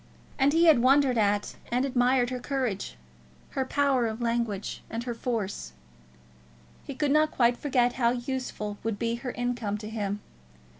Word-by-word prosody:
And 275 +1 +4
he 330 +3 +4
had 315 -7 +7
wondered 270 0 +4
at 205 -1 +1
and 250 +2 +2
admired 250 -1 +2
her 250 - -3
courage, 245 - -3 0.5
her 265 - -1
power 270 -3 +2
of 220 +1 -4
language, 230 -4 -2
and 230 +1 -4
her 240 -1 -3
force. 220 - -3 1.1
He 280 - -7
could 290 0 0
not 305 +1 +4
quite 240 -3 +3
forget 245 -3 +1
how 235 - +5
useful 240 -4 -3
would 225 -2 -2
be 230 +1 -1
her 250 +1 -5
income 240 -4 -2
to 210 0 -7
him. 205 -2 -3
245 Hz, 160 wpm, -28 LUFS, 220-265 Hz, 1.1 s, had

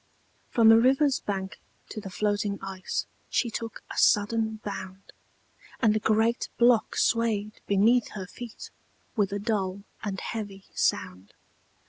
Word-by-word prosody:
From 225 -2 +5
the 225 0 +8
river's 270 +3 +3
bank 195 -1 -4 0.3
to 215 - -6
the 195 - -7
floating 205 +1 -1
ice 190 -1 -3 0.2
She 235 - 0
took 225 -1 -6
a - - -7
sudden 220 +1 +3
bound, 190 -1 -7 0.7
And 220 -4 +4
the 215 - +1
great 220 +2 +1
block 240 -2 +4
swayed 215 -2 0
beneath 220 +5 +4
her 190 -3 -4
feet 235 +4 -9 0.4
With 205 -4 +1
a 200 - -1
dull 200 -2 -2 0.2
and 195 -3 -3
heavy 205 -4 -6
sound. 90 +2 -1
210 Hz, 135 wpm, -27 LUFS, 195-230 Hz, 0.7 s, the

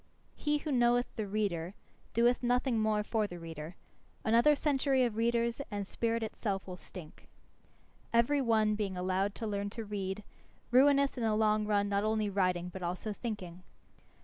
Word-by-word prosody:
He 295 0 0
who 300 +1 -4
knoweth 245 -1 +2
the 215 -2 -3
reader, 195 -3 -2 0.4
doeth 240 +2 +3
nothing 245 -1 +1
more 215 -1 +1
for 215 0 0
the 175 - -8
reader. 165 0 -8 0.5
Another 235 +7 +5
century 275 -2 +2
of 235 -3 0
readers 235 +2 +1
and 205 -2 -3
spirit 230 +3 -1
itself 200 -3 -3
will 185 - -6
stink. 180 -3 -12 0.8
Every 235 +5 +3
one 220 -3 +3
being 200 -3 -2
allowed 190 +2 0
to 230 - -5
learn 205 -1 -2
to 225 +2 -6
read, 200 0 -4 0.5
ruineth 275 +2 +4
in - - -2
the 220 -1 +2
long 215 -1 +2
run 205 -1 +2
not 200 0 0
only 215 -1 0
writing 185 -2 0
but 185 +1 -8
also 180 +5 -3
thinking. 195 -6 -6
215 Hz, 165 wpm, -32 LUFS, 195-235 Hz, 0.8 s, Another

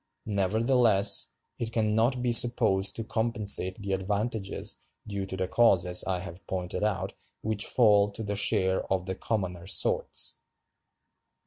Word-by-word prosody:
Nevertheless, 110 +1 +2 0.3
it 115 -1 -4
can 110 -2 0
not 120 +3 0
be 120 - 0
supposed 110 -5 +4
to 115 - -4
compensate 110 -5 +2
the 100 -1 -4
advantages 100 +2 -2 0.3
due 100 -2 -5
to 95 - -6
the 95 -1 -2
causes 90 -5 +3
I 95 -1 -1
have 95 -1 -11
pointed 90 -1 -4
out 100 -3 -2 0.3
which 110 -1 0
fall 105 -4 +3
to 110 - -6
the 105 -1 -3
share 95 -2 +2
of 95 -2 -1
the 95 - -3
commoner 90 -4 -4
sorts. - - 0
100 Hz, 140 wpm, -27 LUFS, 95-110 Hz, 0.3 s, supposed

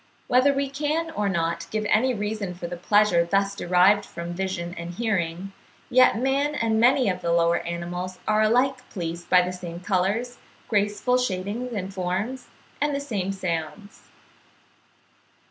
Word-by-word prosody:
Whether 255 +3 +4
we 280 0 -1
can 300 +4 -2
or 210 -10 -1
not 170 -2 -1
give 215 0 -2
any 250 +6 +3
reason 210 -4 -3
for 175 - -7
the 175 +1 -4
pleasure 200 -1 +3
thus 195 +3 0
derived 185 +2 +4
from 170 +1 -7
vision 180 -1 -3
and 170 +1 -7
hearing, 195 -4 -2 0.4
yet 255 -2 +5
man 275 +4 0
and 225 -3 +1
many 250 +1 +4
of 180 -1 -1
the 170 - -1
lower 170 0 +3
animals 175 +2 -5
are 215 0 +3
alike 250 +4 +2
pleased 170 -2 -5
by 180 -1 +6
the 180 +1 -3
same 175 -1 -7
colours, 200 +7 -1 0.3
graceful 210 +4 +1
shading 225 +2 -3
and 190 0 -5
forms, 190 +8 -3 0.3
and 295 -1 +1
the - - -1
same 205 -9 -3
sounds. 185 +1 -5
200 Hz, 155 wpm, -25 LUFS, 175-245 Hz, 0.4 s, by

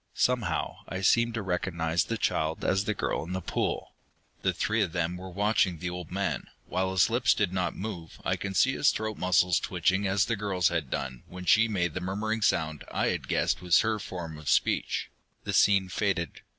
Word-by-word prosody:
Somehow 125 -4 0
I 95 +2 -4
seemed 115 +4 +3
to 115 - -2
recognize 85 -3 0
the 115 - -2
child 80 -5 -1
as 95 +2 +2
the 110 - -1
girl - - -1
in 85 +3 -6
the 95 - -1
pool. 90 - -2 0.5
The - - +2
three 110 +1 0
of 90 -5 -1
them 85 0 -1
were 95 +1 -8
watching 100 -2 +1
the 90 +2 -4
old 90 -2 -6
man. 95 0 -2 0.2
While 95 0 -1
his 95 -4 +3
lips - - +3
did 90 - 0
not 90 -1 -1
move, 90 -6 -6
I - - +2
could 100 -1 -5
see 130 +7 +4
his 145 - +3
throat 110 -1 -3
muscles 90 -2 +3
twitching 95 +2 0
as 95 +1 +2
the 115 - 0
girl's 95 -4 +1
had 80 -6 -2
done 65 -3 -4
when 90 0 -9
she 110 +6 +5
made 90 -7 -1
the 90 - -4
murmuring 105 +4 -2
sound 80 -6 +1
I - - 0
had - - -3
guessed - - +1
was 90 -1 +4
her 110 -1 0
form 85 -5 -6
of 75 - -5
speech. - - +1 0.3
The - - -3
scene 100 -2 +4
faded. 95 -4 -1
95 Hz, 205 wpm, -28 LUFS, 85-105 Hz, 0.5 s, she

